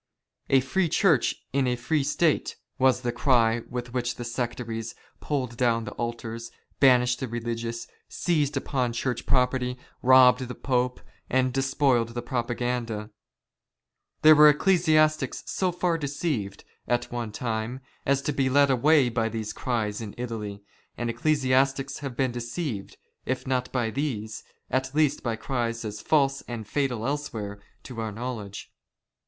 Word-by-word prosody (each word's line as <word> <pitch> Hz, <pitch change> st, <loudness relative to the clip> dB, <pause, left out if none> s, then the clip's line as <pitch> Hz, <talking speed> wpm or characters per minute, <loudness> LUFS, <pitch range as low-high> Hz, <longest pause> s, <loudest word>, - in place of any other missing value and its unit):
" -, -, -44 dB
A 135 Hz, -1 st, +5 dB
free 170 Hz, +7 st, 0 dB
Church 160 Hz, -, +3 dB, 0.2 s
in 135 Hz, -1 st, +2 dB
a 125 Hz, -, +1 dB
free 135 Hz, +5 st, 0 dB
State," 155 Hz, +2 st, +1 dB, 0.2 s
was 130 Hz, -1 st, +4 dB
the 120 Hz, -1 st, -1 dB
cry 120 Hz, -2 st, +3 dB
with 120 Hz, -1 st, -5 dB
which 120 Hz, -1 st, -1 dB
the 120 Hz, -, -6 dB
sectaries 120 Hz, -2 st, -4 dB, 0.2 s
pulled 130 Hz, -5 st, -2 dB
down 115 Hz, -2 st, +2 dB
the -, -, -6 dB
altars, 115 Hz, -1 st, -5 dB, 0.3 s
banished 125 Hz, -2 st, +5 dB
the 130 Hz, -, -3 dB
religious, 115 Hz, 0 st, -4 dB, 0.2 s
seized 150 Hz, -5 st, 0 dB
upon 130 Hz, -3 st, -1 dB
Church 120 Hz, 0 st, -2 dB
property, 125 Hz, -1 st, +1 dB, 0.2 s
robbed 130 Hz, 0 st, +6 dB
the 125 Hz, -, -6 dB
Pope, 125 Hz, -1 st, -1 dB, 0.3 s
and 130 Hz, 0 st, +2 dB
despoiled 135 Hz, -3 st, +1 dB
the 120 Hz, -, -3 dB
Propaganda. 120 Hz, -3 st, -2 dB, 1.1 s
There 155 Hz, 0 st, +10 dB
were 150 Hz, 0 st, +9 dB
ecclesiastics 155 Hz, -1 st, +3 dB
so 185 Hz, -2 st, 0 dB
far 175 Hz, -1 st, 0 dB
deceived, 140 Hz, -, -3 dB, 0.2 s
at 120 Hz, 0 st, 0 dB
one 120 Hz, -3 st, -3 dB
time, 115 Hz, +2 st, -3 dB, 0.2 s
as 140 Hz, 0 st, +1 dB
to 150 Hz, -, -1 dB
be 135 Hz, -1 st, +1 dB
led 140 Hz, +1 st, +4 dB
away 140 Hz, +2 st, +4 dB
by 115 Hz, -1 st, 0 dB
these 110 Hz, -1 st, -4 dB
cries 110 Hz, -4 st, -2 dB
in 105 Hz, -2 st, -7 dB
Italy, 105 Hz, -4 st, -5 dB, 0.3 s
and 120 Hz, -1 st, -1 dB
ecclesiastics 135 Hz, +1 st, +1 dB
have 135 Hz, -4 st, -6 dB
been 130 Hz, -2 st, +1 dB
deceived, 120 Hz, -, -5 dB, 0.3 s
if 130 Hz, 0 st, -2 dB
not 130 Hz, -1 st, -1 dB
by 120 Hz, -4 st, 0 dB
these, 110 Hz, -5 st, -3 dB, 0.3 s
at 130 Hz, +1 st, -1 dB
least 150 Hz, -2 st, +2 dB
by 115 Hz, -2 st, -1 dB
cries 115 Hz, -1 st, -3 dB
as 105 Hz, -1 st, -5 dB
false 140 Hz, -3 st, +2 dB
and 115 Hz, -3 st, -6 dB
fatal 125 Hz, -5 st, -1 dB
elsewhere 110 Hz, -8 st, -4 dB, 0.2 s
to 120 Hz, -3 st, -6 dB
our 110 Hz, -1 st, -3 dB
knowledge. 110 Hz, -3 st, -6 dB
125 Hz, 150 wpm, -26 LUFS, 115-135 Hz, 1.1 s, There